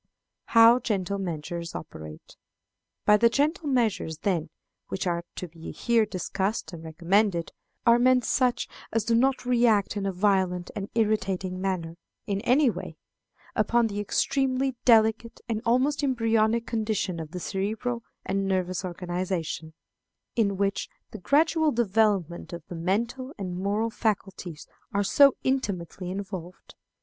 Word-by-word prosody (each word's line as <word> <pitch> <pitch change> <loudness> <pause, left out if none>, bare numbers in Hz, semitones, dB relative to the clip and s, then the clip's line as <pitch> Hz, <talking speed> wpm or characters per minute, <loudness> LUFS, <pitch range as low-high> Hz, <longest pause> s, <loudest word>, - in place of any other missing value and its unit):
How 230 +1 +7
Gentle 200 -4 -2
Measures 170 -1 -4
operate. 80 - -9 0.7
By 210 - +6
the 235 +2 +5
gentle 300 +6 0
measures, 225 - 0
then, 175 -6 0 0.4
which 190 - -3
are 170 -1 -1
to 180 - -5
be 165 0 -10
here 230 -3 +2
discussed 195 +1 -2
and 165 -1 -8
recommended, 170 +3 +1 0.3
are 235 0 +6
meant 250 -1 +4
such 245 -1 +1 0.2
as 225 -1 +1
do 230 - +1
not 255 +2 +2
react 235 -5 +3
in 200 -1 -2
a - - 0
violent 185 -2 +1
and 200 -1 -4
irritating 190 -4 0
manner, 175 -4 -2 0.3
in 200 -1 -2
any 260 +5 +4
way, 180 -7 -3 0.6
upon 235 +2 +3
the 205 -2 -3
extremely 265 +4 0
delicate, 225 0 +4
and 225 -2 -2
almost 265 +5 +2
embryonic 230 -3 +2
condition 215 -6 -1
of 160 -2 -6
the 180 - -6
cerebral 215 +6 -2 0.2
and 195 0 -1
nervous 185 0 -1
organization, 175 -3 -3 0.6
in 200 -4 +1
which 200 0 -1 0.2
the 215 - -8
gradual 315 - +3
development 205 - +1
of 170 -2 -7
the 175 - -6
mental 235 - -2
and 185 -3 -4
moral 205 +5 -1
faculties 195 -7 -3 0.3
are 200 0 +1
so 275 +6 +6
intimately 195 -9 -2
involved. 190 -2 -7
205 Hz, 140 wpm, -27 LUFS, 180-235 Hz, 0.7 s, How